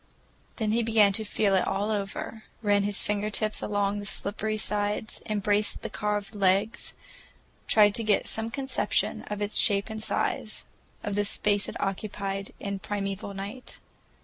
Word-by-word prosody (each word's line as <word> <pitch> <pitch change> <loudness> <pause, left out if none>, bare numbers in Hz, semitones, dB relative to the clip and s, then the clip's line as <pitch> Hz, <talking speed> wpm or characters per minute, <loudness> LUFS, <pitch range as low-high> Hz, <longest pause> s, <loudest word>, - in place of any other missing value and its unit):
Then 220 -3 0
he 230 +2 +3
began 220 -3 +5
to 220 +2 +2
feel 205 -1 +1
it 190 - +3
all 205 +2 0
over, 210 +2 -4 0.2
ran 205 -1 +4
his 200 0 0
finger 210 0 0
tips 215 0 0
along 205 0 0
the 205 - -5
slippery 215 +2 -2
sides, 210 0 -1
embraced 210 0 +1
the - - -4
carved 210 0 -2
legs, 200 +2 +1 0.7
tried 205 -2 +6
to 230 - +2
get 210 -2 +3
some 225 +1 -1
conception 265 +2 0
of 210 0 -2
its 205 +1 0
shape 200 +1 +3
and 220 0 -4
size, - - -1 0.4
of 205 - -2
the 205 +1 +2
space 205 0 +1
it - - -6
occupied 195 0 -3
in 200 -1 -3
primeval 200 -1 -3
night. 205 +6 -7
205 Hz, 160 wpm, -28 LUFS, 200-215 Hz, 0.7 s, tried